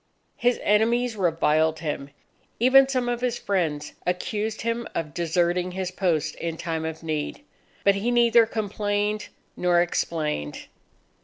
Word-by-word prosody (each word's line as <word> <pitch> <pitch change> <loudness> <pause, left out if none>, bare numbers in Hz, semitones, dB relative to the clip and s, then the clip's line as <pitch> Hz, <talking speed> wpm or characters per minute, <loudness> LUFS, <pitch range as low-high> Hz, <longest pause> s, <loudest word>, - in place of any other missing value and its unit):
His 245 0 +2
enemies 230 +3 +2
reviled 160 -4 +2
him. 145 -3 -3 0.5
Even 265 +3 +6
some 255 -2 0
of 240 0 -1
his 245 -1 0
friends 160 -7 -1
accused 210 +4 -2
him 230 +1 -2
of 150 -3 -3
deserting 175 +2 0
his 185 -1 -3
post 170 -6 0
in 165 -1 -4
time 160 -1 -3
of 160 0 -5
need. 155 - -3 0.4
But 200 - +5
he 200 +4 -1
neither 235 -1 +5
complained 210 -1 -1 0.3
nor 175 -1 +3
explained. 155 - -2
185 Hz, 135 wpm, -25 LUFS, 160-230 Hz, 0.5 s, Even